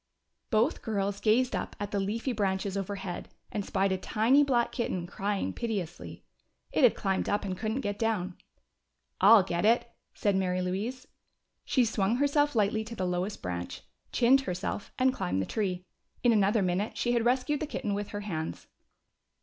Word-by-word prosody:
Both 225 +6 +2
girls 200 -2 -1
gazed 240 +4 +2
up - - -4
at 205 0 -4
the 200 - 0
leafy 220 +6 -1
branches 195 -3 -1
overhead 195 -2 -4 0.2
and 205 - -2
spied 195 0 0
a 190 - 0
tiny 235 +9 +3
black 245 -4 +2
kitten 185 -8 -2
crying 200 +2 -2
piteously. 200 -8 -4 0.5
It - - +1
had 245 - +6
climbed 195 -2 -1
up 205 0 0
and 190 -2 -2
couldn't 220 +6 -2
get 205 -3 -3
down. 200 -5 -1 0.8
"I'll 225 -4 +8
get 175 -1 -2
it," 235 +2 +3 0.2
said 205 -2 +1
Mary 185 -1 +1
Louise. 205 +8 -3 0.6
She 255 -3 +3
swung 215 -1 +1
herself 285 +1 +2
lightly 215 0 +2
to 230 - -7
the 185 - -2
lowest 180 +3 -2
branch, 90 -1 -4 0.3
chinned 255 +3 +5
herself, 185 -2 -4
and 260 0 +3
climbed 95 - -1
the 95 - 0
tree. 185 - -2 0.4
In 240 - +5
another 205 0 +3
minute 185 +4 -1
she 240 - +1
had 235 -1 +2
rescued 260 +4 +1
the 310 - -3
kitten 210 -7 -3
with 205 0 -2
her 205 - -5
hands. 160 -6 -4
205 Hz, 175 wpm, -29 LUFS, 190-235 Hz, 0.8 s, I'll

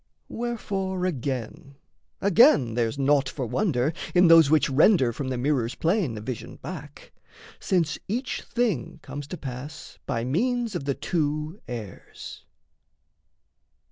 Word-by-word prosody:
Wherefore 195 -6 -3
again, 135 -4 -4 0.5
again, 195 - +5
there's 115 +2 -1
naught 140 -1 +2
for 130 -1 -4
wonder 150 - 0 0.2
In 180 0 +6
those 165 -3 +8
which 155 -1 +4
render 135 - +4
from 135 +3 -4
the 130 -1 -2
mirror's 125 -2 0
plane 165 - 0
A - - -6
vision 115 +1 -6
back, - - -9 0.5
since 170 -5 0
each 245 +6 -2
thing 220 - -1
comes 145 -1 -7
to 180 - -6
pass 135 +1 -8
By 115 - -1
means 235 - 0
of 175 -6 -4
the 140 -1 0
two 155 +1 -2
airs. 115 -5 -8
145 Hz, 130 wpm, -26 LUFS, 130-190 Hz, 0.5 s, those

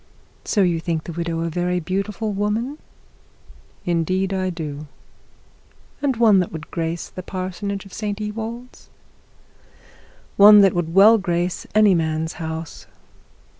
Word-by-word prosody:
'So 205 - +1
you 175 -2 +1
think 165 -1 -2
the - - -7
widow 165 0 -3
a 165 - -1
very 180 +2 -1
beautiful 200 +5 -3
woman?' 220 +8 -2 1.1
'Indeed 185 +3 0
I 185 -1 -1
do.' 155 -4 -6 1.1
'And 280 -3 +1
one 220 -4 +5
that 180 - -1
would 160 -2 -9
grace 165 0 -3
the 185 - -8
parsonage 190 +2 -5
at 195 - -14
St 210 -1 -4
Ewold's.' 225 +3 -7 1.5
'One 210 +1 +9
that 195 -1 +4
would 195 +6 +5
grace 175 -1 -2
any 215 -2 +6
man's 160 -1 -1
house.' 160 0 -6
185 Hz, 130 wpm, -21 LUFS, 165-210 Hz, 1.5 s, One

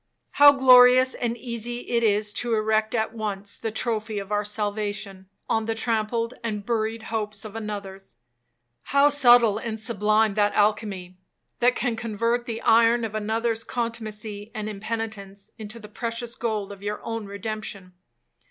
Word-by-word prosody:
How 290 0 +8
glorious 255 -1 +6
and 240 -1 -3
easy 240 0 -3
it 235 -1 -1
is 210 -1 +1
to 235 +2 0
erect 215 +1 +1
at 220 0 -1
once 205 -3 -4
the 225 - -4
trophy 220 -1 -2
of 200 0 -6
our 210 0 +1
salvation, 205 -2 -3 0.2
on 225 -1 0
the 225 - -1
trampled 230 +1 -1
and 210 -3 -4
buried 225 -1 -2
hopes 210 -1 -3
of 215 0 -9
another's! 200 - -7 0.8
How 285 +1 +7
subtle 240 -6 +5
and 225 -1 -4
sublime 215 -1 +1
that 205 0 +1
alchemy, 205 -4 0 0.4
that 245 +1 +3
can 245 -3 -1
convert 230 +2 -1
the 225 -1 -4
iron 230 +1 +4
of 220 - -6
another's 225 +1 -1
contumacy 220 -3 -5
and 215 -1 -4
impenitence 210 -2 -6
into 215 +1 -7
the 210 -2 -11
precious 230 +2 -4
gold 215 -4 -3
of 200 -1 -11
your 205 +1 -4
own 225 -2 -4
redemption! 200 -2 -6
220 Hz, 150 wpm, -24 LUFS, 210-230 Hz, 0.8 s, How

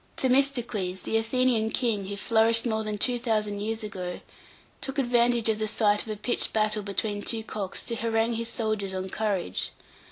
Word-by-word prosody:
Themistocles, 245 -8 +1
the - - -2
Athenian 225 0 +2
king, 220 -4 0
who 200 - -4
flourished 230 +2 +3
more 220 -2 0
than 215 -1 -3
two 245 +3 +1
thousand 210 -3 0
years 220 +2 -2
ago, 185 -4 -5 0.6
took 270 +1 -3
advantage 240 -3 +3
of 220 -1 +1
the 215 - 0
sight 210 -1 +2
of - - -11
a 215 - -3
pitched 240 +4 0
battle 215 -1 +1
between 205 +1 -2
two 225 +1 -1
cocks 205 -3 -2
to 235 - -2
harangue 225 0 +1
his 230 0 -1
soldiers 215 -4 -1
on 185 0 -4
courage. 200 - -1
220 Hz, 180 wpm, -27 LUFS, 205-230 Hz, 0.6 s, flourished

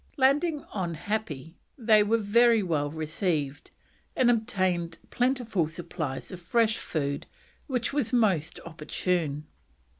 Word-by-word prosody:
Landing 290 +3 +3
on 175 -5 -2
Happi 165 -6 -4 0.2
they 220 -4 +5
were 215 +2 +3
very 230 +1 +4
well 150 -5 0
received, 155 -2 -2 0.5
and 245 -2 +4
obtained 185 -7 0
plentiful 245 - +1
supplies 160 -4 -5
of 185 - -7
fresh 225 +4 +2
food, 140 -2 -3 0.4
which 255 -2 -1
was 280 -6 0
most 200 - +2
opportune. 155 -1 -2
185 Hz, 115 wpm, -28 LUFS, 160-230 Hz, 0.5 s, they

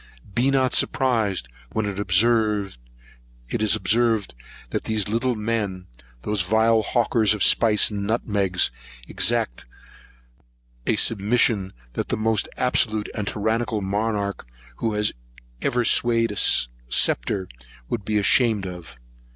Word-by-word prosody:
Be 125 +6 +1
not 130 -2 +1
surprised 110 - +1 0.3
when 110 - -1
it 100 - -2
is 90 - -1
observed, 110 +1 +1 0.4
that - - -2
these 110 -2 -1
little 115 +4 0
great 105 - -7
men, 100 -5 -2 0.4
those 105 -2 -1
vile 110 +4 +2
hawkers 110 -1 +1
of 105 - 0
spice 110 -2 +4
and 100 -1 -4
nutmegs, 100 - +1 0.4
exact - - 0 1.2
a - - +2
submission 105 -2 +1 0.2
that - - -3
the - - -2
most 110 0 0
absolute 110 -4 0
and 105 -2 -4
tyrannical 110 +1 -1
monarch 100 - -2 0.3
who 110 -2 -2 0.6
ever 125 -2 0
swayed 115 -1 +2
a - - -6 0.6
sceptre 95 +10 +1 0.4
would 115 -4 -4
be 105 +2 -1
ashamed 105 0 +2
of. 90 -8 -9
105 Hz, 120 wpm, -23 LUFS, 95-115 Hz, 1.2 s, spice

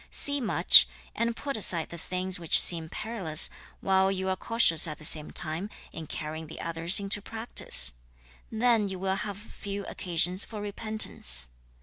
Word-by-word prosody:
See 285 -1 -3
much 230 - +7 0.3
and 230 0 -3
put 280 +2 -6
aside 175 -6 +1
the 170 - -10
things 185 +2 -1
which 165 -2 +2
seem 165 -2 +4
perilous, 190 -9 +1 0.3
while 190 0 +1
you 190 0 -4
are 190 - -2
cautious 185 -8 +2
at 155 -1 -7
the 155 - -9
same 150 0 -3
time 165 +5 -4 0.2
in 160 -1 -9
carrying 155 +1 -7
the 160 - -12
others 165 +3 -1
into 200 +1 -2
practice: 225 - +2 0.6
then 225 -2 0
you 190 - -7
will 190 +1 -3
have 205 0 -6
few 200 -1 -9
occasions 180 +2 -1
for 215 - -10
repentance. 205 - +2
190 Hz, 160 wpm, -26 LUFS, 165-215 Hz, 0.6 s, much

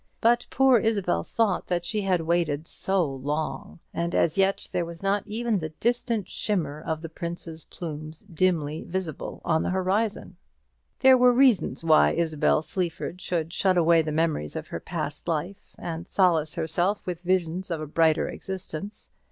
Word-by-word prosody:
But 240 +1 +3
poor 265 -3 +5
Isabel 200 - +1
thought 220 -5 0
she 210 +4 -1
had 185 -3 +1
waited 160 -2 0
so 190 +1 0
long, 145 +3 -4 0.2
and 170 0 -2
as 165 - +2
yet 195 0 +1
there 175 - 0
was 170 +1 -9
not 200 +1 +2
even 225 -1 0
the 160 -2 -4
distant 235 -4 0
shimmer 155 -8 -2
of 160 0 -3
the - - -4
prince's 165 0 -7
plumes 155 -1 -7
dimly 165 -5 0
visible 180 -4 -5
on 160 -2 +2
the - - -1
horizon. 190 +4 -1 0.6
There 260 -1 +7
were 250 0 +7
reasons 245 -11 +3
why 160 -1 +5
Isabel 160 -2 +1
Sleaford 180 +1 -3
should 170 -2 -2
shut 185 -2 +2
away 170 -1 +5
the 155 -1 -3
memory 155 - 0
of - - -5
her - - -4
past - - -5
life, 170 +4 -4
and 165 +1 -5
solace 165 -5 +2
herself 175 +7 0
with 175 -3 -4
visions 180 0 0
of 165 -2 -2
a 155 - -4
brighter 160 +1 +2
existence. 190 +1 -6
175 Hz, 160 wpm, -26 LUFS, 160-195 Hz, 0.6 s, There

